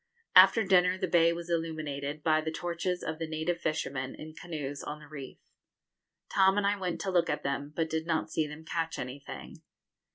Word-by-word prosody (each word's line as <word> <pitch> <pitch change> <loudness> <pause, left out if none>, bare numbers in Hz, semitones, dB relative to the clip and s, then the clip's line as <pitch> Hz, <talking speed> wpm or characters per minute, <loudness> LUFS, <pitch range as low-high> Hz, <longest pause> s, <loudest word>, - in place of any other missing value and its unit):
After 195 +4 +8
dinner 185 -1 +4
the 185 - -1
bay 170 -1 +5
was 170 0 -5
illuminated 155 -3 -3
by 155 -1 +3
the 160 - -2
torches 175 +2 -2
of 160 - -4
the 165 - -2
native 160 +2 -2
fishermen, 140 -4 -2
in 155 0 -9
canoes, 150 -4 -5
on 150 - -5
the 150 - -13
reef. 140 -3 -8 0.9
Tom 190 0 +4
and 205 - +2
I 200 +1 +3
went 185 -3 -3
to 190 - -1
look 175 -2 +3
at - - -1
them, 140 +1 -2
but 165 -1 +1
did 160 0 -2
not 160 -2 0
see 155 -1 0
them 150 +2 -10
catch 165 0 -2
anything. 130 +3 -7
160 Hz, 195 wpm, -30 LUFS, 150-175 Hz, 0.9 s, After